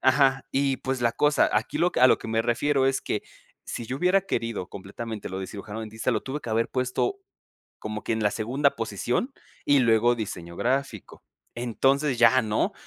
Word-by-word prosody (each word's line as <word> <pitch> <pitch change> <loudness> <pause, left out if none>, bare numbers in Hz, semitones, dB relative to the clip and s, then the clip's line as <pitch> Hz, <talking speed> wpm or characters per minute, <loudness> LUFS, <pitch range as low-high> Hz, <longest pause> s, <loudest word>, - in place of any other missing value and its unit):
Ajá, 135 0 +3
y, 135 -1 +1
pues, 130 0 -3
la 115 -1 +2
cosa 150 +4 +3
aquí 110 +3 0
lo 175 +1 +2
que - - -1
a 130 - +9
lo - - +4
que - - -8
me 110 0 +1
refiero 130 +4 +1
es 135 0 +1
que - - -3 0.4
si 120 - -5
yo 130 - -3
hubiera 180 +5 +3
querido 115 - -3
completamente 105 +3 -7
lo 95 - -4
de 95 - -4
cirujano 105 +2 -7
dentista, 110 +2 -3
lo 110 -3 -1
tuve 140 +3 -4
que 115 - -7
haber 115 +1 +1
puesto 130 - -1 0.6
como 110 0 -5
que - - -1
en 110 -1 -1
la 105 - +3
segunda 130 +6 +1
posición, 115 - -2 0.3
y 145 -1 +5
luego 120 0 +4
diseño 90 -6 -6
gráfico. 130 -4 -2 0.3
Entonces, 135 +3 +1
ya, 130 +2 +6
¿no? 110 -2 0
120 Hz, 195 wpm, -26 LUFS, 110-135 Hz, 0.6 s, a